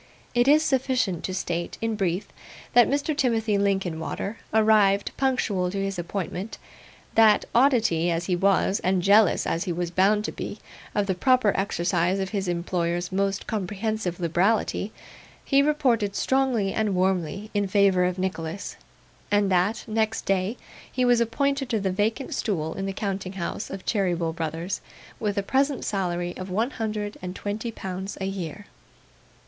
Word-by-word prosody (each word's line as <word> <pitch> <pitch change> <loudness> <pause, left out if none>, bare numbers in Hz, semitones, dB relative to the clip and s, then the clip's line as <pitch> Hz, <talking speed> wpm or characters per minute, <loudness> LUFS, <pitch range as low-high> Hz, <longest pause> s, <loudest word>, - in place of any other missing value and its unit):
It 240 +1 +3
is 305 +2 +6
sufficient 255 - 0
to 185 - -3
state, 175 -2 -3
in 225 0 -1
brief, 195 0 -1 0.4
that 245 -1 +7
Mr. 285 +2 0
Timothy 225 -7 +1
Linkinwater 195 +1 -1
arrived, 215 -2 +4
punctual 220 -9 0
to 195 - -4
his 195 -1 -2
appointment; 185 +3 -4 0.6
that, 220 -2 +5
oddity 230 - +3
as 170 0 -1
he 180 - +1
was, 195 +1 +2
and 185 -1 +1
jealous, 200 -1 +5
as 165 - -1
he 180 - -2
was 175 0 -2
bound 205 +4 +3
to - - -2
be, - - -6 0.4
of 205 - +2
the 195 - 0
proper 250 +2 +3
exercise 180 -1 +1
of 190 0 -2
his 195 -3 -2
employers' 175 0 -1
most 195 +1 0
comprehensive 205 -2 -2
liberality, 190 +5 +1 0.5
he 275 -1 +4
reported 255 -9 +1
strongly 255 -7 +1
and 215 -3 0
warmly 185 +2 0
in 205 -1 +1
favour 195 -2 +4
of 180 0 -1
Nicholas; 185 -1 -4 0.5
and 205 -1 +2
that, 185 +5 +2
next 220 0 -1
day, 195 +4 0 0.3
he 255 -1 +1
was 245 -1 +4
appointed 275 +3 0
to 225 - +1
the 195 -1 -1
vacant 215 +7 -1
stool 160 -8 -1
in 195 0 -4
the - - -1
counting 195 -2 -3
house 195 +3 -4
of 195 -1 -7
Cheeryble, 175 -6 0
Brothers, 165 +3 -3 0.4
with 205 -2 -1
a 200 - +1
present 270 +5 +1
salary 175 -3 -2
of 185 +1 -6
one 220 +8 0
hundred 215 -3 -3
and 180 0 -5
twenty 215 +4 -4
pounds 190 -1 -6
a 190 - -2
year. 195 0 -5
200 Hz, 160 wpm, -25 LUFS, 180-220 Hz, 0.6 s, that